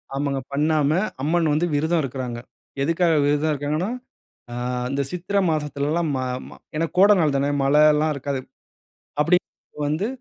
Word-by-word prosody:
ஆமங்க. 140 -1 -1
பண்ணாம 150 0 +2 0.3
அம்மன் 160 +2 +1
வந்து 155 +4 +2
விருதம் 160 +3 +1
இருக்குறாங்க. 125 -3 -4 0.4
எதுக்காக 165 +2 +2
விரதம் 145 +2 +2
இருக்காங்கன்னா? 150 +6 -2 0.6
ஆ - - -6 0.4
இந்த 140 +1 0
சித்திரை 185 +3 -1
மாசத்துலலாம், 150 +2 -1
ம - - -1 0.3
ம - - -12 0.2
ஏன்னா 165 +2 +1
கோட 195 +3 +7
நாள் 150 -4 +2
தானே! 140 +1 +1
மழை 145 +2 +4
எல்லாம் 155 +1 +1
இருக்காது. 140 0 -3 0.8
அப்பிடி 165 +4 +4 0.5
வந்து 155 +8 0
150 Hz, 140 wpm, -23 LUFS, 140-165 Hz, 0.8 s, கோட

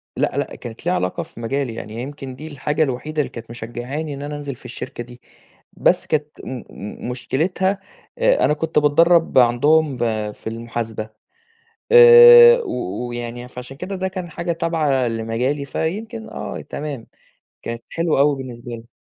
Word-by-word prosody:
لأ، - - -1
لأ، - - -2
كانت 120 +3 -10
ليها 180 - +2
علاقة 90 - -2
في - - -15
مجالي، 125 +1 -2
يعني 110 +1 -6
يمكن 135 -1 -7
دي 155 +4 -9
الحاجة 150 +1 -1
الوحيدة 150 +3 -2
اللي 140 - -4
كانت 115 -1 -10
مشجّعاني 120 +6 -5
إن 140 - -7
أنا 145 +1 -5
أنزل 140 -3 -6
في 125 - -18
الشركة 120 -1 -7
دي، 125 +1 -15 0.5
بس - - +2
كانت 150 -1 0 0.2
م - - -7 0.2
م 105 +4 -8
مشكلتها 170 +10 -1 0.4
آآ، - - +3
أنا - - +3
كنت 160 +1 0
باتدرّب 165 +2 +4
عندهم 140 +4 +3
ب 110 -3 -1
في - - -12
المحاسبة 115 -1 -5 0.8
آآ، 475 0 +10
و 120 0 -4
ويعني 120 +1 -6
فعشان 125 +2 -9
كده 185 +6 -5
ده 190 0 -2
كان 180 -2 -6
حاجة 170 +2 -3
تابعة 155 -6 0
لمجالي، 115 +5 -2
فيمكن 220 - -4
آه - - -6
تمام، 145 -6 -6 0.6
كانت 115 0 -6
حلوة 165 -3 0
أوي 145 +1 +4
بالنسبة 125 -2 -8
لي. 115 0 -9
140 Hz, 165 wpm, -21 LUFS, 120-160 Hz, 0.8 s, آآ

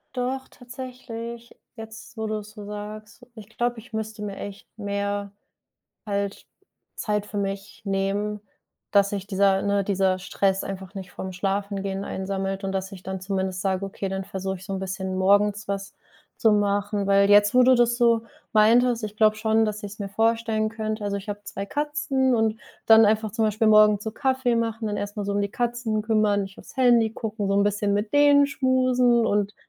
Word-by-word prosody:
Doch, 260 +1 -2
tatsächlich. 240 -2 -9 0.2
Jetzt, 225 0 -11
wo 220 - -2
du 215 0 -2
es 210 0 -11
so 210 -1 -10
sagst, 210 +3 -8
ich 215 -3 -11
glaube, 240 0 0
ich 230 +1 -16
müsste 220 0 -4
mir 200 -1 -5
echt 200 0 -8
mehr 200 -1 -3 0.8
halt 200 -1 -3 0.5
Zeit 210 -1 -1
für 210 - -8
mich 200 +1 -4
nehmen, 200 +1 -1 0.5
dass 200 -1 +4
sich 200 -1 -4
dieser, 195 -1 +3
ne 200 0 +1
dieser 190 -1 +1
Stress 190 +1 0
einfach 190 0 -7
nicht 190 -2 -8
vorm 190 - -6
Schlafengehen 195 +1 -2
einsammelt 195 0 -3
und 195 - -2
dass 190 0 -3
ich 190 -3 -11
dann 190 0 -5
zumindest 190 -1 -2
sage: 190 0 -1
„Okay, 195 0 -4
dann 190 0 -3
versuche 190 0 -4
ich 185 - -13
so 195 - -6
'n 195 - -2
bisschen 190 0 -4
morgens 205 +2 +2
was 195 0 -4 0.4
zu 225 - +4
machen“. 205 0 0
Weil 200 0 +4
jetzt, 205 +1 +6
wo 250 - +7
du 255 +1 +6
das 240 0 +3
so 235 -2 +4 0.3
meintest, 230 +2 +4
ich 210 0 -6
glaube 215 0 +4
schon, 220 0 +2
dass 210 0 -4
ich's 205 +1 -8
mir 200 - -3
vorstellen 225 +1 +1
könnte. 215 -1 -4
Also, 200 0 -1
ich 200 - -12
habe 205 0 -5
2 200 0 -5
Katzen 275 -2 0
und 220 -1 +1 0.3
dann 225 0 +8
einfach 215 +1 +2
zum 225 +2 0
Beispiel 215 +1 +2
morgens 210 -1 +6
so 220 - -3
Kaffee 260 +1 0
machen, 225 -1 -1
dann 205 -1 -2
erstmal 205 0 -4
so 200 - -1
um 200 - 0
die 200 - -2
Katzen 240 -2 -1
kümmern, 215 -2 +2
nicht 195 0 -9
aufs - - -14
Handy 240 -4 +4
gucken, 220 -3 -4
so 195 - 0
'n 200 - +4
bisschen 205 0 +1
mit 205 +1 -1
denen 285 -1 +6
schmusen 255 -3 +2
und 205 0 0
210 Hz, 190 wpm, -25 LUFS, 200-225 Hz, 0.8 s, dann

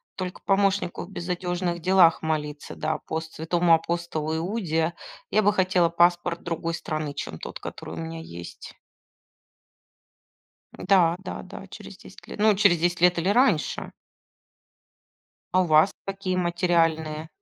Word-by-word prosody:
Только 185 -1 -5
помощнику 195 -2 +1
в - - -16
безодёжных 175 -1 -3
делах 180 -1 +4
молиться, 150 -2 -3
да, 155 +1 -2
пост 160 0 -4
святому 170 +1 +2
апостолу 165 -1 -1
Иуде. 170 -3 -1 0.4
Я 215 - +4
бы 205 0 +4
хотела 185 -3 +2
паспорт 175 0 +2
другой 165 0 -3
страны, 155 -3 -4
чем 80 - -6
тот, - - -7
который 80 - -8
у - - -10
меня 80 0 -5
есть. 85 +1 -10 2.0
Да-да-да, 180 -1 0
через - - -11
10 - - -15
лет. - - -9
Ну, 215 -1 +4
через 195 -4 +4
10 175 0 0
лет 180 0 +5
или 180 +4 0
раньше. 215 - +2 1.6
А 185 - +5
у - - -2
вас 155 +4 +5
какие 195 -2 -3
материальные? 165 -3 +1
175 Hz, 130 wpm, -25 LUFS, 160-185 Hz, 2.0 s, лет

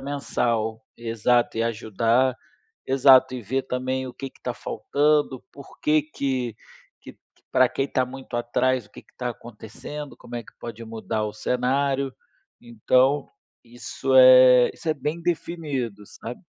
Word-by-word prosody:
mensal. 115 -5 -2
Exato, 115 +1 0
e 115 - +2
ajudar 115 +3 +1 0.5
exato, 130 -1 +5
e 125 - -5
ver 130 +6 -1
também 130 +1 -3
o 125 - -9
que 135 +1 -7
que - - -26
tá 125 -1 -3
faltando, 145 -2 0
por 140 -1 -14
que 155 +1 +3
que 130 -6 -3 0.5
que - - -12 0.4
pra 130 -1 +5
quem 135 - -2
tá 130 -1 0
muito 130 -1 -10
atrás, 125 0 0
o - - -27
que - - -13
que - - -31
tá 125 -1 -3
acontecendo, 125 +5 -9
como 120 0 -9
é 120 - -4
que - - -17
pode 115 -1 -8
mudar 110 -1 -3
o 105 - -5
cenário. 135 +3 0 0.5
Então 125 +4 +1 0.4
isso 120 +2 -4
é 130 -1 +8
isso - - -7
é 155 - +2
bem 150 +4 -4
definido, 150 - -3
sabe. 120 +2 -9
125 Hz, 150 wpm, -24 LUFS, 120-135 Hz, 0.5 s, é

